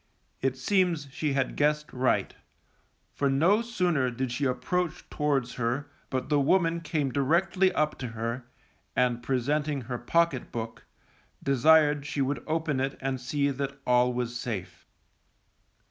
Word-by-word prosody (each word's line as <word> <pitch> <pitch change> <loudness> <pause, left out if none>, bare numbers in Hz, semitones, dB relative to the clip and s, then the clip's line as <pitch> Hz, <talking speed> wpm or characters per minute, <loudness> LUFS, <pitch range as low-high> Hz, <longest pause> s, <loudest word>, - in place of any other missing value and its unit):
It 130 0 0
seems 175 0 +1
she 145 +1 -1
had 135 -1 0
guessed 150 0 +1
right, 130 0 +1 0.8
for 140 - +1
no 170 +11 +4
sooner 180 - +1
did 125 +1 -3
she 140 +4 -1
approach 155 +7 -1
towards 140 -4 0
her 130 +5 -1 0.2
but 130 -1 -2
the 145 -1 +2
woman 165 +3 +2
came 150 -4 -1
directly 175 +7 +2
up 150 0 0
to 125 - -3
her, 115 +2 -4 0.5
and 120 -1 +2
presenting 140 +3 0
her 125 0 -5
pocket 165 0 +1
book, 115 -1 -6 0.6
desired 145 +2 +4
she 140 +1 -4
would 135 +1 0
open 155 -3 0
it 135 +1 -1
and 135 -1 -2
see 140 +2 0
that 140 0 -4
all 125 0 +4
was 120 -1 -3
safe. 110 -6 -5
140 Hz, 145 wpm, -28 LUFS, 125-155 Hz, 0.8 s, no